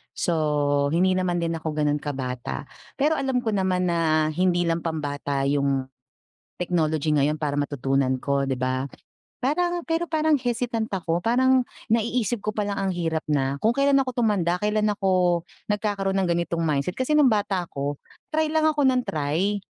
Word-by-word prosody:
so, 145 -3 +1
hindi 180 +4 +3
naman 180 -1 0
din 165 - -1
ako 155 -1 -4
ganun 150 -1 +1
kabata. 130 -4 -4 0.3
Pero 300 +2 +1
alam 265 -2 0
ko 225 - 0
naman 185 -3 +1
na 155 -2 +2
hindi 175 +2 +1
lang 165 -1 0
pambata 145 -4 -2
yung 140 -1 +1 0.7
technology 160 -4 0
ngayon 150 0 +2
para 145 -2 -2
matutunan 135 -2 0
ko, 140 -1 0
'di 135 - 0
ba? 130 +1 -1 0.5
Parang 345 +6 0
pero 330 +1 -1
parang 315 -1 +2
hesitant 240 -4 -1
ako, 175 -3 -1
parang 260 +4 +3 0.3
naiisip 235 0 0
ko 215 - -2
pa 210 -1 -2
lang 205 - -2
ang 195 - 0
hirap 165 -2 -1
na, 140 -1 0
kung 220 - +3
kailan 275 +3 +3
ako 260 - -2 0.2
tumanda 180 -5 +1
kailan 210 +2 +1
ako 185 -4 +2 0.3
nagkakaroon 205 -2 0
ng 190 - +2
ganitong 170 0 -1
mindset. 150 +3 -1
Kasi 260 +4 0
nung 300 -3 +6
bata 195 -5 0
ako 140 +1 -4 0.3
try 315 0 +2
lang 315 0 +2
ako 305 -2 +2
ng 260 -2 +3
try, 165 +8 -1
175 Hz, 165 wpm, -24 LUFS, 150-230 Hz, 0.7 s, nung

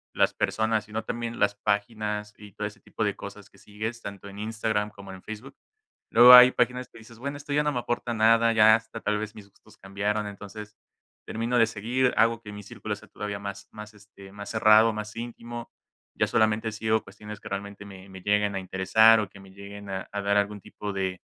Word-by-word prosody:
las - - +3
personas, 110 -1 0
sino 110 +1 -5
también 115 0 -4
las 100 0 +2
páginas 105 0 -2
y 105 -1 -13
todo - - -3
ese - - -13
tipo - - -4
de - - -1
cosas - - -10
que - - -23
sigues, 110 +3 -6
tanto 100 -2 -8
en 100 0 -10
Instagram 110 -1 -1
como 100 -2 -11
en 95 - -11
Facebook. 115 +6 -9 0.6
Luego 120 +2 +9
hay 125 0 +11
páginas 125 +1 -1
que - - -16
dices: 115 +1 -15
"Bueno, 140 +3 -4
esto 145 0 -6
ya 150 +1 +3
no 150 - +1
me 125 - -2
aporta 120 0 -3
nada, 115 +1 +4
ya 110 -1 +7
hasta 115 0 -6
tal 105 0 0
vez 110 0 -5
mis 100 -2 -12
gustos - - -22
cambiaron". 105 +2 -2
Entonces 105 +1 -9 0.5
termino 115 +2 -1
de 115 - +6
seguir, 120 +4 0
hago 115 0 +3
que 105 -2 -10
mi 105 0 -8
círculo - - -6
sea - - -16
todavía 105 -1 -5
más 100 0 -7
más, 105 0 -10
este, 100 -2 -15
más 100 0 -8
cerrado, 110 0 +5
más 105 0 -6
íntimo, 120 0 -7 0.4
ya - - +1
solamente 110 0 +1
sigo 110 +1 0
cuestiones 105 0 -10
que - - -11
realmente 100 +1 -6
me 95 -1 -12
me 95 0 -10
lleguen 105 +1 +1
a - - -1
interesar 95 +4 +4
o 105 - -5
que 100 - -15
me 95 0 -15
lleguen 100 +1 -10
a 95 -1 -5
a 100 - -3
dar 100 0 +1
algún 105 0 0
tipo 105 +2 -7
de 95 -2 -3
105 Hz, 215 wpm, -26 LUFS, 100-115 Hz, 0.6 s, hay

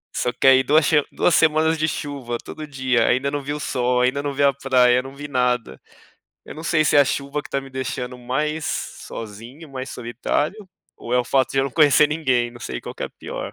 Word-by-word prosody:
Só 125 - 0
que, - - 0
aí, 130 0 +7
duas 150 +4 +4
shema 150 -2 +3
duas 175 - +2
semanas 160 0 +3
de 155 +1 +1
chuva, 135 -6 -4
todo 155 - -8
dia. 130 -5 +1
Ainda 130 +3 +2
não 145 0 -3
vi 145 +2 -4
sol. 125 -3 0
Ainda 130 +3 +1
não 145 -1 -2
vi 140 +1 0
a 140 -1 +5
praia, 125 -2 +3
não 135 - -10
vi 145 +1 -7
nada. 125 -3 -1 0.7
Eu - - -10
não 160 +2 -9
sei 155 -2 +2
se 145 - +3
é - - +8
a - - +5
chuva 140 +2 -2
que - - -12
tá 140 - -1
me 135 0 -12
deixando 125 -1 -4
mais 150 +5 -2
sozinho, 115 +8 -7
mais 130 0 -6
solitário, 145 - -3 0.3
ou 120 - -4
é - - +4
o 125 - +1
fato 130 -3 +1
de 135 - 0
eu 135 - +3
não 135 - -3
conhecer 150 +1 +5
ninguém. 130 -6 0
Não 120 - -13
sei 125 - -5
qual - - -7
que - - -7
é - - -2
a - - -15
pior. - - -7
135 Hz, 240 wpm, -22 LUFS, 125-150 Hz, 0.7 s, é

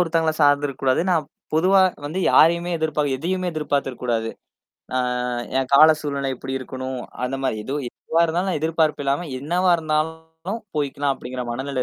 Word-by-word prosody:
ஒருத்தங்கள 165 -2 +2
சார்ந்துருக்கூடாது. 140 -2 +2
நான் 160 -5 +1 0.3
பொதுவா 190 +4 +5 0.2
வந்து, 160 +6 -3
யாரையுேமே 170 +2 +4
எதிர்பார் 150 -3 0
எதையுமே 180 +5 -2
எதிர்பார்த்துருக்ககூடாது. 125 -6 -1 0.7
ஆ - - +3 0.6
என் 135 0 -1
கால 155 +3 +9
சூழ்நிலை 140 -2 -2
எப்படி 130 +2 -6
இருக்கணும்? 130 0 -5 0.2
அந்த 135 +2 -2
மாரி 130 -5 0
எதோ 135 +5 -3
எதுவா 165 +6 -2
இருந்தாலும் 175 +2 -1
எதிர்பார்ப்பு 160 -2 +1
இல்லாம, 140 +5 0
என்னவா 175 +6 +2
இருந்தாலும் 160 +5 -3 0.2
போய்க்கலாம் 140 -1 0
அப்படிங்கிற 125 -1 -6
மனநிலை 130 +1 -2
150 Hz, 135 wpm, -22 LUFS, 135-165 Hz, 0.7 s, கால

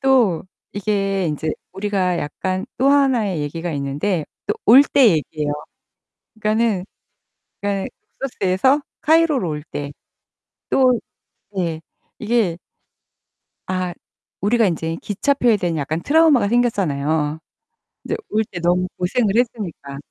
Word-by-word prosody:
또 250 - +3 0.3
이게 195 -2 0
인제 155 0 -2 0.2
우리가 190 -2 0
약간 185 +6 -3
또 265 +2 +3
하나의 250 - +2
얘기가 165 +4 -3
있는데 145 +5 -1 0.2
또 - - 0
올 250 +6 +9
때 275 -3 +4
얘기예요. 155 -3 -1 0.8
그러니까는 215 -3 +1 0.8
그러니까 200 -1 -1 0.3
룩소스에서 260 +2 +2 0.2
카이로로 315 - +3
올 150 -1 -4
때 145 -2 -6 0.8
또 255 -2 +4 0.6
네. 170 -4 -2 0.4
이게 215 -6 +1 1.1
아 185 -1 -2 0.5
우리가 225 +3 +3
인제 165 -2 -2
기차표에 235 +2 +2
대한 175 -4 -1
약간 155 +3 -2
트라우마가 290 - +4
생겼잖아요. 160 -10 0 0.7
이제 - - -1
올 220 +1 +1
때 175 - -6
너무 180 +1 +2
고생을 200 +3 +1
했으니까. 195 - -2
195 Hz, 265 characters per minute, -20 LUFS, 165-235 Hz, 1.1 s, 올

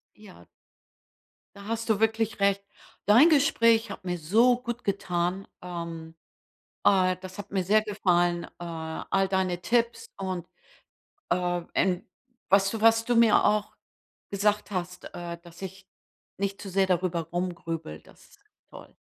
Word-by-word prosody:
Ja. 210 -3 -15 1.1
Da 200 0 -11
hast 230 +1 -3
du 215 -2 +2
wirklich 225 -1 0
recht. 200 0 +2 0.4
Dein 235 +10 +7
Gespräch 230 -8 +3
hat 195 - -8
mir 180 -1 -2
so 225 +10 +4
gut 240 -1 -5
getan. 185 -1 -1
Ähm, 170 -2 -7 0.7
äh, 185 -2 +4
das 185 +1 -10
hat 205 0 -8
mir 190 -2 -1
sehr 210 +4 +4
gefallen, 175 -5 +1
äh, - - -9
all 170 +3 -2
deine 185 -2 0
Tipps 235 +5 0
und, 185 -3 -4 0.9
äh, 175 0 +1
ähm, 180 -1 +1 0.4
was 195 0 +4
du 225 - -4
was 225 0 +5
du 245 - +1
mir 230 -2 +5
auch 210 0 +1 0.6
gesagt 210 +1 0
hast, 180 -2 -4
äh, 170 -1 -6
dass 170 0 -15
ich 190 +1 -8 0.5
nicht 200 0 -2
zu 200 - -7
sehr 190 +1 +2
darüber 180 -2 0
rumgrübel, 170 - -4
das - - -20
ist - - -23 0.3
toll. - - -13
195 Hz, 145 wpm, -27 LUFS, 175-215 Hz, 1.1 s, Dein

